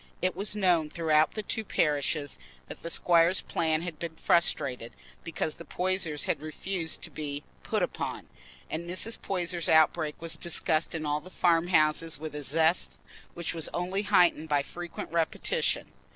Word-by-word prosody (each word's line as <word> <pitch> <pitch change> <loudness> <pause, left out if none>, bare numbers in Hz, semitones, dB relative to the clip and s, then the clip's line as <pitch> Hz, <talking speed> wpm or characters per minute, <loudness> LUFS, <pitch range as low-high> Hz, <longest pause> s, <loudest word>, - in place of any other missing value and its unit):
It 185 -1 0
was 200 +3 -1
known 175 -6 +2
throughout 155 -1 +2
the 215 - -3
two 220 - -2
parishes 150 -5 0 0.3
that - - -9
the 170 - -5
squire's 170 +1 +4
plan 160 0 0
had 170 -3 -6
been 165 -1 -5
frustrated 140 -8 +1 0.3
because 160 -2 -3
the 170 - -9
Poysers 180 -4 -1
had - - -1
refused 160 +2 -3
to - - -5
be 145 -1 -5 0.2
"put - - -1
upon," - - -4 0.4
and 170 +2 -5
Mrs. 200 +6 -1
Poyser's 175 -3 -1
outbreak 160 -1 +3
was 165 0 +1
discussed 165 -1 0
in 155 -1 -3
all 150 0 0
the 185 - -12
farm 170 -2 +2
houses 155 -2 +2
with 155 0 -7
a 150 - -5
zest 160 +4 +1 0.4
which 170 -1 -3
was 165 -2 -1
only 185 +3 -1
heightened 175 -6 +3
by 145 -1 +2
frequent 175 0 -7
repetition. 165 -1 0
165 Hz, 165 wpm, -29 LUFS, 155-175 Hz, 0.4 s, squire's